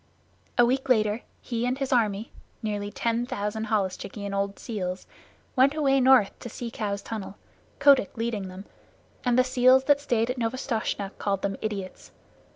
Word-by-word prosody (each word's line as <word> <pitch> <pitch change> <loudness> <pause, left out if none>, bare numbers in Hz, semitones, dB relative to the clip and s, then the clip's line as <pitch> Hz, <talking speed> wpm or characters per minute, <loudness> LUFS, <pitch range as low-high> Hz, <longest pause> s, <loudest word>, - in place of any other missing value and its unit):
A 240 - +7
week 265 +2 0
later 215 -2 +3 0.2
he 235 -1 -3
and 255 +1 0
his 270 -1 -1
army 215 -2 +1 0.3
(nearly 205 -1 -2
ten 235 +2 -1
thousand 210 +1 -3
holluschickie 200 -1 -2
and 200 - -4
old 200 0 -1
seals) 185 -5 -4 0.5
went 270 +2 +4
away 275 -3 +3
north 255 -6 +6
to 240 - -7
the - - -13
Sea 235 -2 -5
Cow's 200 -3 -3
tunnel, 210 -3 -6 0.4
Kotick 275 -7 +4
leading 225 -4 -2
them, 185 +2 -9 0.6
and 245 -1 +2
the 255 - +6
seals 255 +1 +5
that 285 +1 +3
stayed 240 -3 +1
at 250 - -5
Novastoshnah 225 -4 -2
called 195 -2 -1
them 195 -1 -1
idiots. 200 -4 -5
225 Hz, 165 wpm, -26 LUFS, 200-255 Hz, 0.6 s, A